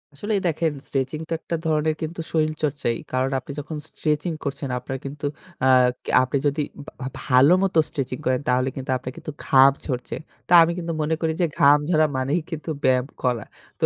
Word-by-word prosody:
আসলে 205 +9 -3
দেখেন 165 0 +1 0.2
স্ট্রেচিং 135 +2 -2
তো - - -1
একটা 170 - -3
ধরনের 155 0 +1
কিন্তু 165 +2 -4
শরীরচর্চাই। 155 -6 0 0.2
কারণ 130 +1 +1
আপনি 130 - -10
যখন 155 +2 -6
স্ট্রেচিং 150 +2 -1
করছেন 140 -1 -4
আপনার 130 +2 -5
কিন্তু 140 +1 -6 0.4
আ - - +5 0.5
আপনি 130 +2 -1
যদি 145 +1 0 0.2
ভা 130 - -7 0.2
ভালো 135 +3 +5
মত 195 - 0
স্ট্রেচিং 130 -2 -3
করেন 130 +1 +1
তাহলে 130 +1 +2
কিন্তু 135 -1 -7
আপনার 125 0 -7
কিন্তু 165 -2 -6
ঘাম 135 0 +7
ঝড়ছে। 125 -4 -3 0.3
তা - - +3
আমি 165 - +1
কিন্তু 170 -1 -3
মনে 155 +2 +1
করি 160 -1 +1
যে - - +4
ঘাম 145 +1 +7
ঝরা 155 -3 +4
মানেই 140 +6 0
কিন্তু 160 0 -5
ব্যায়াম 130 0 +3 0.2
করা। 120 -4 0 0.3
তো - - +3
145 Hz, 180 wpm, -23 LUFS, 130-160 Hz, 0.5 s, ঘাম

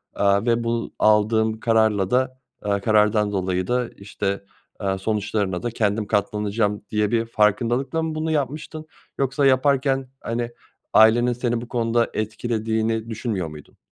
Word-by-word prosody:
Aaa, 100 +2 +2
ve 120 0 +2
bu 115 0 -2
aldığım 110 +1 +3
kararla 110 -4 +2
da, 130 +1 +1 0.3
eee, 100 -1 +1
karardan 105 0 +3
dolayı 95 -2 -1
da 125 -1 0
işte, 100 -1 -4 0.4
aaa, 95 -1 -1
sonuçlarına 105 -2 -1
da 120 - -1
kendim 105 -1 0
katlanacağım 105 0 0
diye 105 0 0
bir 115 -1 +1
farkındalıkla 120 +7 +1
mı 160 -1 -3
bunu 160 +1 -1
yapmıştın 155 +2 -3 0.3
yoksa 135 +1 +1
yaparken, 135 0 +2
hani, 120 +1 -3 0.4
ailenin 120 +3 +5
seni 120 -1 -1
bu 120 - -8
konuda 115 -1 +1
etkilediğini 110 0 -2
düşünmüyor 110 -6 -3
muydun? 75 -1 -12
110 Hz, 140 wpm, -23 LUFS, 105-120 Hz, 0.4 s, ailenin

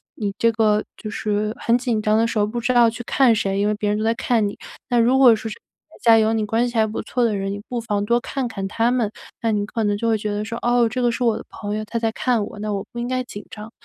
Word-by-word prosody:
你 205 -3 -3
这 230 0 +3
个 215 -1 +2
就 215 - -7
是 210 0 -1
很 235 - +2
紧 245 -3 -1
张 215 0 +2
的 230 +1 +2
时 225 - -2
候， 205 - +3
不 235 +3 -4
知 245 +2 0
道 240 -1 +6
去 230 +2 -4
看 250 -3 +4
谁， 195 -2 -1
因 205 - +1
为 210 - +1
别 210 0 -2
人 210 - 0
都 215 - -2
在 225 - +2
看 230 -2 +1
你。 - - -7 0.3
那 245 -2 +3
如 250 +3 +4
果 250 -4 +8
说 220 +1 -5
是 - - -7
台 - - -25 0.2
下 225 - +7
有 220 0 +3
你 220 -1 0
关 225 +3 +1
系 240 - -8
还 220 -1 +3
不 215 - -4
错 240 +3 -2
的 215 -3 +1
人， 195 0 -2
你 205 - -5
不 245 - -3
妨 205 -3 -1
多 235 +3 +2
看 260 0 -3
看 195 -3 -5
他 230 +4 +1
们。 240 -5 0 0.3
那 225 -1 +1
你 205 -1 0
可 225 0 -2
能 205 0 +1
就 230 +2 -1
会 220 - +3
觉 210 0 -3
得 205 +1 -2
说： 230 +2 -5
“哦， 240 -1 +4
这 250 +2 -3
个 240 -1 +2
是 245 - -3
我 230 -2 +2
的 - - -7
朋 205 0 -5
友， 215 - -3
他 230 +2 -3
在 225 -1 0
看 235 -4 0
我， 205 - -9
那 210 0 -2
我 195 -1 -2
不 240 - -7
应 240 - -2
该 255 0 -1
紧 205 -4 -9
张， 215 +1 -9
225 Hz, 335 characters per minute, -22 LUFS, 210-235 Hz, 0.3 s, 果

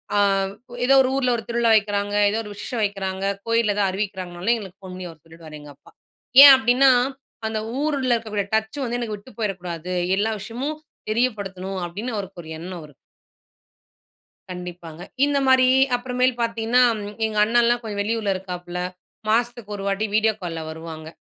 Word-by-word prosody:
ஆ - - +3 0.7
ஏதோ 270 +2 +5
ஒரு 255 - 0
ஊர்ல 255 -2 +2
ஒரு 225 - -6
திருவிழா 235 -1 +2
வைக்கிறாங்க, 205 -1 0
ஏதோ 215 +2 -1
ஒரு 210 - -9
விஷேசம் 215 +3 -4
வைக்கிறாங்க, 195 -2 -2 0.2
கோயில்ல 230 -3 +2
ஏதாவது 200 -2 +2
அறிவிக்கிறாங்கனாலும் 190 +1 -2
எங்களுக்கு 195 -5 -10
ஃபோன் 185 -1 -9
பண்ணி 185 -1 -6
அவரு 160 -3 -15
சொல்லிடுவாரு, 160 -2 -12
எங்க 150 0 -12
அப்பா! - - -20 0.5
ஏன் 280 -1 +12
அப்டின்னா, 260 +2 +4 0.6
அந்த 220 0 -2 0.2
ஊருல 280 -5 +1
இருக்கக்கூடிய 215 -3 -3
டச் 220 +6 -2
வந்து 240 0 -2
எனக்கு 215 -3 -4
விட்டு 205 +6 -17
போயிறக்கூடாது, 180 -4 -4 0.2
எல்லா 215 +2 +1
விஷயமும் 255 +8 -4 0.3
தெரியப்படுத்தணும் 195 -5 -2
அப்டின்னு 215 +7 -5
அவருக்கு 195 -3 -6
ஒரு 160 - -12
எண்ணம் 180 +1 -7
அவருக்கு. 150 -2 -14 1.6
கண்டிப்பாங்க. 175 -2 -8 0.2
இந்தமாரி 265 -3 +4 0.3
அப்புறமேல் 250 +1 0
பார்த்தீங்கன்னா, 230 +2 +2 0.2
ம் 205 +1 -7
எங்க 215 -1 -3
அண்ணன்லாம் 240 +1 +3
கொஞ்சம் 205 -2 -3
வெளியூர்ல 215 -1 0
இருக்காப்ல. 180 -1 -6 0.5
மாசத்துக்கு 235 -1 0
1 195 - -6
வாட்டி 200 +2 0
வீடியோ 220 0 +3
கால்ல 165 -2 -4
வருவாங்க. 160 0 -8
210 Hz, 155 wpm, -23 LUFS, 185-235 Hz, 1.6 s, ஏன்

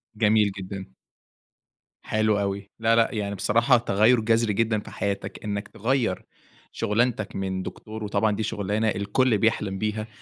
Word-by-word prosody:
جميل 105 -1 +3
جدًا. 95 0 -7 1.1
حلو 110 -1 +1
أوي. 100 0 -3
لأ، 115 0 +3
لأ، 115 -1 +4
يعني 100 -1 -2
بصراحة 115 +6 +3
تغيُّر 115 +2 +3
جَذري 115 -1 +2
جدًا 110 0 +1
في - - -11
حياتك، 100 -1 -4
إنّك 105 -1 -3
تغيَّر 115 -2 -1 0.5
شُغلانتك 110 0 0
من 95 -1 -2
دكتور 110 0 -7
وطبعًا 105 +1 +1
دي 110 - -2
شُغلانة 105 +1 -1
الكل 105 +4 +1
بيحلم 105 -3 0
بيها، 110 +1 -2
105 Hz, 140 wpm, -25 LUFS, 100-115 Hz, 1.1 s, لأ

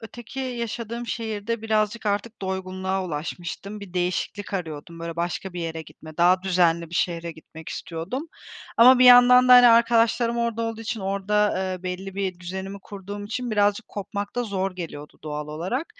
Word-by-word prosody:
öteki 240 +3 -8
yaşadığım 235 -1 -4
şehirde 225 0 -3
birazcık 215 0 0
artık 205 +2 -2
doygunluğa 190 0 -2
ulaşmıştım. 175 +5 -5
Bir 195 -3 -11
değişiklik 180 +3 -2
arıyordum. 165 -2 -5
Böyle, 165 0 -5
başka 175 +2 -3
bir 180 - -5
yere 165 -1 -4
gitme, 155 0 -14
daha 180 +2 +4
düzenli 170 -3 +2
bir - - -8
şehre 170 -1 -1
gitmek 160 0 -12
istiyordum. 185 - -5 0.5
Ama 250 +2 +8
bir 255 - +6
yandan 250 0 +8
da, 250 - +9
hani, 245 0 +10
arkadaşlarım 230 0 +4
orada 230 -1 -1
olduğu 225 0 -3
için, 225 0 -4
orada, 200 +2 +1
ııı, 185 -1 -3
belli 185 +1 -5
bir 190 -2 -3
düzenimi 190 +2 -6
kurduğum 205 +1 -8
için, 240 +3 -4
birazcık 205 +1 +1
kopmak 205 0 -5
da 245 - 0
zor 195 -3 -2
geliyordu 150 -4 -8
doğal 150 -1 -5
olarak. 185 - -3
195 Hz, 165 wpm, -24 LUFS, 175-230 Hz, 0.5 s, hani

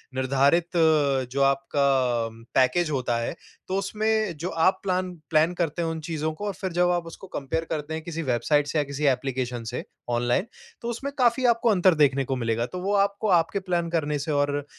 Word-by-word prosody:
निर्धारित 140 +6 +2
अ, 150 -5 +3
जो 140 - -1
आपका 135 +1 +2 0.7
पैकेज 155 +6 +3
होता 125 -4 0
है, 115 +8 -3 0.3
तो 190 - -1
उसमें 215 -2 0
जो 175 +5 -3
आप 185 - +4
प्लान 185 -1 -1 0.2
प्लैन 160 +2 +3
करते 170 -2 -2
हो 165 - -1
उन 160 - -4
चीज़ों 155 0 -2
को, 205 +6 -6
और 200 - -2
फिर 190 -1 -4
जब 175 0 +3
आप 175 -1 -1
उसको 180 +3 -10
कंपेयर 160 0 -3
करते 155 0 -3
हैं 160 - -4
किसी 165 0 -4
वेबसाइट 140 +4 +1
से 155 - -2
या 150 - +3
किसी 140 +1 -4
एप्लिकेशन 125 -2 -4
से - - -4 0.3
ऑनलाइन, 120 - +1 0.3
तो 235 - -5
उसमें 270 +4 -4
काफ़ी 245 +1 +3
आपको 235 0 +3
अंतर 185 -3 +4
देखने 140 -2 +3
को 135 +1 -1
मिलेगा। 115 -1 -1
तो 180 +8 -6
वो 200 +2 -1
आपको 200 +2 +1
आपके 165 +5 -2
प्लान 175 -3 -1
करने 150 -3 -1
से 155 +2 -3
और 145 0 0
160 Hz, 205 wpm, -25 LUFS, 140-185 Hz, 0.7 s, आप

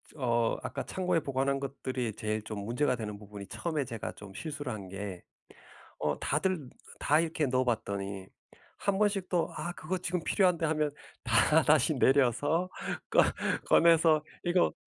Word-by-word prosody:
어 120 -5 +1
아까 - - -4
창고에 180 -2 0
보관한 140 -1 0
것들이 130 -4 -3
제일 110 0 -2
좀 110 -2 -5
문제가 125 +5 +1
되는 105 -3 -5
부분이 100 -1 -10
처음에 155 -4 -2
제가 115 -3 -5
좀 100 -2 -12
실수를 145 +4 -5
한 100 -3 -6
게 95 -2 -6 0.8
어 75 -1 0
다들 155 -2 -1 0.3
다 150 +2 +3
이렇게 160 -2 0
넣어 130 0 +1
봤더니 100 -5 -2 0.5
한 200 -1 0
번씩 200 -3 +1
또 175 -2 +1
'아 155 +3 -3
그거 180 +4 -3
지금 180 0 -2
필요한데.' 180 -5 +2
하면 155 -1 +1 0.3
다 140 +6 +4
다시 150 +2 +4
내려서 140 +6 +3 0.4
꺼 - - +5 0.5
꺼내서 165 -2 +5 0.2
이거 175 0 +2
140 Hz, 295 characters per minute, -30 LUFS, 115-165 Hz, 0.8 s, 꺼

